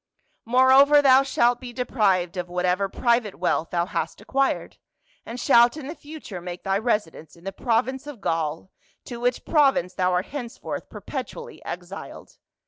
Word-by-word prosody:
Moreover 260 +4 +6
thou 270 -2 +6
shalt 245 -3 +2
be 250 -1 -7
deprived 200 -8 0
of 180 -1 -4
whatever 180 +2 0
private 235 -2 +1
wealth 170 -2 -1
thou 170 -1 0
hast 190 - -4
acquired, 270 +6 -1 0.5
and 240 +2 -6
shalt 240 +3 +5
in 300 - -7
the 295 - -5
future 295 - -9
make 175 0 -7
thy 195 0 0
residence 205 - -2
in 170 - -19
the 195 - -4
province 255 +5 -1
of 290 -6 -8
Gaul, 165 +1 -2 0.3
to 240 -2 -7
which 245 +1 -1
prov 290 -4 +4
ince 180 +1 -3
thou 185 0 +1
art 180 +1 0
henceforth 245 -5 -6
perpetually 475 -1 -7
exiled. 180 +2 -9
230 Hz, 160 wpm, -24 LUFS, 180-260 Hz, 0.5 s, Moreover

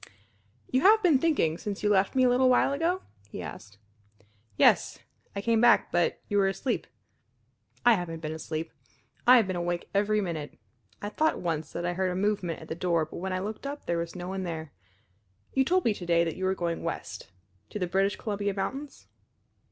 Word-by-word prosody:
"You 255 - +2
have 430 +5 +6
been 320 -7 +5
thinking, 260 - +1
since 205 -1 -5
you 210 - +3
left 195 +1 +2
me 260 - +4
a - - +5
little 255 +1 +4
while 255 +2 +3
ago?" 340 +6 0 0.3
he - - -7
asked. 100 +6 -9 0.8
"Yes. - - +4 0.4
I 200 - -2
came 230 0 +2
back. 240 0 +5
But 175 -1 +1
you 205 - +1
were 195 - +4
asleep." 195 +7 -2 1.0
"I 240 - +8
haven't 175 -5 -3
been 155 -1 -4
asleep. 160 0 -5 0.6
I 250 +1 +9
have 225 - +4
been 185 -1 -3
awake 175 0 -3
every 210 +1 +2
minute. 165 -7 -4 0.5
I 205 - -2
thought 315 +8 +1
once 160 -3 -3
that 175 - -3
I 175 - 0
heard 185 +1 0
a 180 - -3
movement 195 -3 -1
at - - -12
the - - -3
door 170 -2 0
but 155 - -10
when 190 +2 -4
I 185 - 0
looked 215 +7 -5
up 285 +1 -6
there 170 -1 0
was 170 +1 -5
no 180 0 -6
one 190 +1 -3
there. 160 -4 -5 0.8
You 265 - +3
told 365 +6 +1
me 225 - +3
to 180 - -8
day 170 -1 +4
that 165 -2 -3
you 185 - -3
were 190 0 +1
going 170 -2 -2
west - - -5 0.4
to - - -5
the 185 - -1
British 195 +3 +1
Columbia 205 -2 -3
mountains?" 270 +8 -5
190 Hz, 205 wpm, -28 LUFS, 170-235 Hz, 1.0 s, I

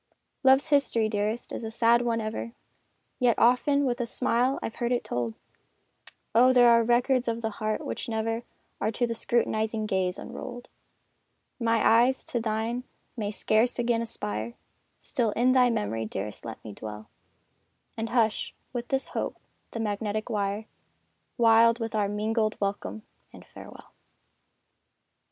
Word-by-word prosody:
Love's 265 +3 +5
history, 275 -6 +3
dearest, 215 +2 -2
is - - -5
a 220 - -3
sad 235 +1 +3
one 235 -1 0
ever, 220 +1 -4 0.7
Yet 245 -3 +3
often 280 +4 +3
with 245 -1 -1
a 235 - -2
smile 250 +2 +1
I've 225 - -5
heard 240 0 -1
it 245 - +1
told! 120 -2 -3 1.0
Oh, 250 +3 +6
there 245 -1 +6
are 230 0 +6
records 245 +2 +2
of 230 0 -2
the 220 - -1
heart 215 +1 -3
which - - -4
never 225 +1 -1 0.4
Are 215 - 0
to 240 - +1
the 230 - -2
scrutinizing 220 -1 0
gaze 190 -3 0
unrolled! 245 0 -8 0.9
My 230 -1 +2
eyes 245 +4 +4
to 240 - -3
thine 225 +2 -2 0.3
may 210 -4 -2
scarce 220 +3 +1
again 240 -1 +1
aspire 110 - -4 0.4
Still 235 -3 -1
in 245 +3 +3
thy 255 -1 +5
memory, 110 - -1
dearest 105 0 -6
let 115 - -8
me 105 - -7
dwell, 105 +1 -8 0.9
And 225 0 -3
hush, 225 -3 +1 0.2
with 240 -1 -4
this 270 -1 -1
hope, - - -3 0.3
the 230 - -6
magnetic 215 +1 -2
wire, 205 0 -1 0.7
Wild 230 0 +5
with 225 -1 -4
our 205 -2 +1
mingled 215 +1 -1
welcome 200 +2 -3 0.3
and - - -14
farewell! - - -13
230 Hz, 150 wpm, -27 LUFS, 215-240 Hz, 1.0 s, Oh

